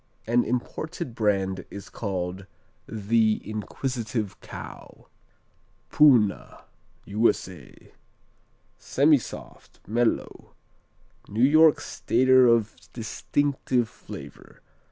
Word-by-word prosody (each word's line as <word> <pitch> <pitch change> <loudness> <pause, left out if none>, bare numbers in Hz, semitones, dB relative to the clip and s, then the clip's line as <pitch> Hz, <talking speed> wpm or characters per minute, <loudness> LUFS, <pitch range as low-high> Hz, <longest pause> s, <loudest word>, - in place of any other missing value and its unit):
An 120 +2 +2
imported 130 +4 -4
brand 100 -4 0
is 100 - -9
called 95 -2 -4 0.4
"The 110 0 +1
Inquisitive 110 -1 -4
Cow." - - -11 0.8
Poona 125 -9 +3 0.4
U.S.A. 100 -3 -2 0.9
Semisoft; 140 -2 0
mellow; 115 +3 -2 0.7
New 110 +4 0
York 155 +2 +6
Stater 130 +1 +3
of 115 -2 +2 0.2
distinctive 125 +2 -1
flavor. - - -12
115 Hz, 70 wpm, -25 LUFS, 105-130 Hz, 0.9 s, York